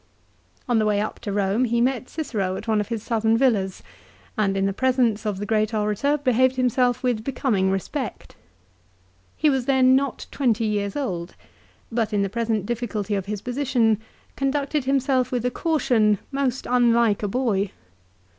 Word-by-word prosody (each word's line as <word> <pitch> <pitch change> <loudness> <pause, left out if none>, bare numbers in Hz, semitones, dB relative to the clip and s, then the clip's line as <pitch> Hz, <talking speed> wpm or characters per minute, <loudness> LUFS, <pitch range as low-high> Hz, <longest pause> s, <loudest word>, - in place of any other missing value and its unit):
On 240 -2 +2
the 215 - +2
way 205 -1 +2
up 215 - -3
to 205 - -5
Eome 200 +5 +1
he 235 +1 +1
met 255 +1 0
Cicero 210 - -2
at 220 - -7
one 215 -2 +2
of 205 - -5
his 225 -2 -4
southern 225 -1 +1
villas, 210 -7 +1 0.5
and 200 -4 +1
in 195 - +1
the 195 - 0
presence 245 -3 +1
of 205 -2 -1
the 205 - -4
great 215 +1 0
orator 215 +8 +1
behaved 260 -2 +2
himself 250 0 +1
with 240 -4 0
becoming 230 -7 0
respect. 190 -2 -4 1.0
He 310 - +2
was 265 -4 +1
then 260 -1 +5
not 275 -1 -1
twenty 235 -5 +1
years 205 -2 -1
old, 180 -11 -3 0.6
but 225 -2 -1
in 205 -1 +2
the 195 - -1
present 225 -2 -1
difficulty 215 -3 -3
of 195 -1 -2
his 210 -1 -4
position 245 -4 +1 0.3
conducted 280 +1 -1
himself 265 -1 +1
with 245 -1 -1
a 250 - +1
caution 245 -10 +2
most 270 -2 -1
unlike 235 -3 +3
a 205 - -1
boy. 210 -3 0
230 Hz, 170 wpm, -23 LUFS, 210-255 Hz, 1.0 s, then